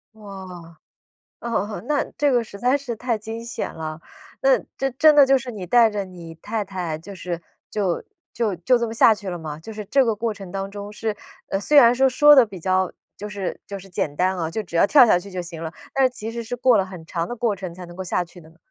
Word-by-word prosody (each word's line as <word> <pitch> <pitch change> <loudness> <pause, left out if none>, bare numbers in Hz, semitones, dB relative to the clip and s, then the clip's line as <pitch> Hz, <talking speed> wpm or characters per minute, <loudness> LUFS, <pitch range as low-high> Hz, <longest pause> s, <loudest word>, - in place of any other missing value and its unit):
哇， 215 -1 -15 1.2
哦 235 - -4
哦， 210 -2 -2
那 295 -1 +1
这 290 -1 +3
个 245 -2 +3
实 205 -2 -11
在 250 +6 +2
是 265 -4 -5
太 235 0 -1
惊 225 +2 -7
险 235 - -5
了。 155 -1 -6 0.4
那 - - +5 0.2
这 270 - 0
真 305 +5 +6
的 285 -2 +8
就 270 0 +5
是 255 -1 -6
你 200 -5 -6
带 230 +4 +5
着 205 -2 -3
你 175 -3 -10
太 215 +6 -3
太， 180 -5 -4
就 190 +6 -10
是 175 -2 -5 0.3
就 195 -5 -1 0.3
就 220 -5 0
就 175 +9 +3
这 235 0 -1
么 225 - -5
下 230 0 +6
去 205 -2 -7
了 175 - -4
吗？ 155 -2 -7
就 220 +7 -9
是 210 0 -6
这 270 +7 +3
个 225 -2 +1
过 225 +1 -2
程 195 -3 -10
当 195 +1 -4
中 205 0 -7
是 220 0 -3 0.3
呃， 195 - 0
虽 295 +9 +3
然 240 -4 +8
说 265 +2 +4
说 295 +3 +7
得 260 -4 +7
比 200 -3 -10
较 185 +1 +1 0.3
就 210 - -6
是 200 -3 -4
就 200 - -5
是 195 0 -13
简 150 -5 -2
单 185 +3 +1
啊， 165 -2 -2
就 215 +6 -3
只 175 - -10
要 170 - +5
跳 275 0 +8
下 195 -6 +4
去 200 +3 -11
就 185 -1 -4
行 170 -2 -8
了， 160 0 -5 0.2
但 270 -1 +4
是 - - +4
其 225 -3 -7
实 235 0 -4
是 235 +2 -5
过 245 -2 +4
了 195 - +1
很 185 -4 -10
长 170 0 -3
的 240 - -5
过 230 -2 0
程 185 -3 -7
才 180 +1 -9
能 175 - -12
够 190 - -5
下 180 0 0
去 175 +1 -15
的 160 -2 -16
呢。 165 - -23
205 Hz, 280 characters per minute, -23 LUFS, 180-235 Hz, 1.2 s, 的